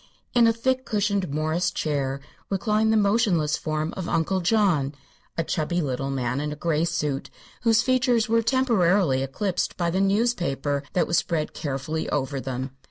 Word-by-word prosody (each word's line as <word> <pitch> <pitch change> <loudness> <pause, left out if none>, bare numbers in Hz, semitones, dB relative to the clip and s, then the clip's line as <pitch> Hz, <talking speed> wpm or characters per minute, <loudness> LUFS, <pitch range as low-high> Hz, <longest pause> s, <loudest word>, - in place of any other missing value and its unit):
In 235 -1 +5
a - - +5
thick 260 +3 0
cushioned 200 - 0
morris 155 +4 0
chair 140 -3 -2 0.3
reclined 215 +2 +1
the 220 - +4
motionless 200 -8 +2
form 155 +1 -2
of 185 -2 -4
Uncle 170 +3 +1
John, 170 -8 +2 0.4
a 165 - +1
chubby 165 +2 -1
little 135 -3 -2
man 130 0 -1
in 150 0 -3
a - - -4
gray 160 0 0
suit, 145 -4 -2 0.3
whose 230 -1 +4
features 250 -3 +2
were 230 +1 +3
temporarily 205 - +2
eclipsed 175 +8 -2
by 170 -1 0
the 190 +3 +1
newspaper 180 - +1
that 175 - +2
was 170 - +2
spread 160 -3 -2
carefully 145 +2 -3
over 140 -1 -1
them. 130 0 -4
170 Hz, 165 wpm, -25 LUFS, 145-215 Hz, 0.4 s, In